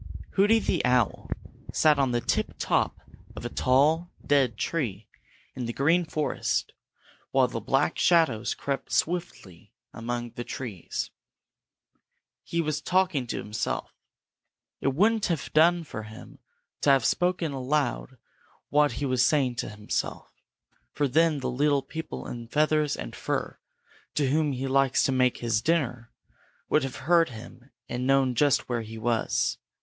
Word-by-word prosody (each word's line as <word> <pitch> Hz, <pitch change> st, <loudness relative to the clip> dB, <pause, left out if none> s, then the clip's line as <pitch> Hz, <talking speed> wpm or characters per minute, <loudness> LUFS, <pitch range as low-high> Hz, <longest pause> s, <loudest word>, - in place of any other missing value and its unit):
Hooty 205 Hz, +4 st, +4 dB
the 225 Hz, -, 0 dB
owl 125 Hz, -3 st, +1 dB, 0.4 s
sat 150 Hz, -2 st, +4 dB
on 135 Hz, -2 st, +3 dB
the 120 Hz, 0 st, 0 dB
tip -, -, -1 dB
top -, -, 0 dB, 0.4 s
of -, -, -7 dB
a -, -, -2 dB
tall 150 Hz, +7 st, +2 dB, 0.2 s
dead 135 Hz, -6 st, +2 dB
tree 115 Hz, -, -2 dB, 0.5 s
in 125 Hz, -2 st, -4 dB
the 120 Hz, -, -3 dB
Green 165 Hz, +7 st, +2 dB
Forest 155 Hz, -1 st, -1 dB, 0.6 s
while -, -, +3 dB
the -, -, -4 dB
Black -, -, 0 dB
Shadows 160 Hz, -11 st, +3 dB
crept 140 Hz, -1 st, -4 dB
swiftly 160 Hz, -, -2 dB, 0.2 s
among 120 Hz, +1 st, -4 dB
the 120 Hz, -, -6 dB
trees. 115 Hz, -9 st, -5 dB, 1.3 s
He 170 Hz, -, -1 dB
was 155 Hz, -2 st, -2 dB
talking 180 Hz, -8 st, +1 dB
to -, -, -3 dB
himself. 105 Hz, +1 st, -3 dB, 0.9 s
It 135 Hz, 0 st, 0 dB
wouldn't 215 Hz, +5 st, +3 dB
have 170 Hz, -4 st, -3 dB
done 170 Hz, +2 st, +5 dB
for 125 Hz, -8 st, -7 dB
him 110 Hz, +1 st, -12 dB, 0.4 s
to -, -, +3 dB
have 135 Hz, -3 st, +4 dB
spoken 180 Hz, -3 st, +1 dB
aloud 135 Hz, -1 st, -1 dB, 0.5 s
what 145 Hz, -3 st, +3 dB
he 140 Hz, +5 st, -3 dB
was 130 Hz, -2 st, +2 dB
saying 130 Hz, -5 st, +2 dB
to -, -, -3 dB
himself, 105 Hz, -1 st, -4 dB, 0.6 s
for 145 Hz, -, 0 dB
then 155 Hz, +1 st, +2 dB
the -, -, -2 dB
little 140 Hz, +2 st, +2 dB
people 160 Hz, +4 st, -6 dB
in 120 Hz, -1 st, -7 dB
feathers 150 Hz, +2 st, +2 dB
and -, -, -7 dB
fur -, -, -3 dB, 0.6 s
on 145 Hz, -, +2 dB
whom 150 Hz, +2 st, +1 dB
he 130 Hz, +1 st, -3 dB
likes 135 Hz, -1 st, +3 dB
to -, -, +2 dB
make 130 Hz, -1 st, +2 dB
his 115 Hz, -2 st, +1 dB
dinner 125 Hz, -6 st, -1 dB, 0.6 s
would 155 Hz, -, +3 dB
have 135 Hz, -2 st, -4 dB
heard 170 Hz, 0 st, +4 dB
him 120 Hz, +2 st, -12 dB, 0.2 s
and 125 Hz, +1 st, -3 dB
known 135 Hz, -2 st, +3 dB
just 145 Hz, +3 st, +2 dB
where 120 Hz, -2 st, -1 dB
he 110 Hz, 0 st, -8 dB
was. 115 Hz, 0 st, 0 dB
135 Hz, 150 wpm, -27 LUFS, 120-155 Hz, 1.3 s, done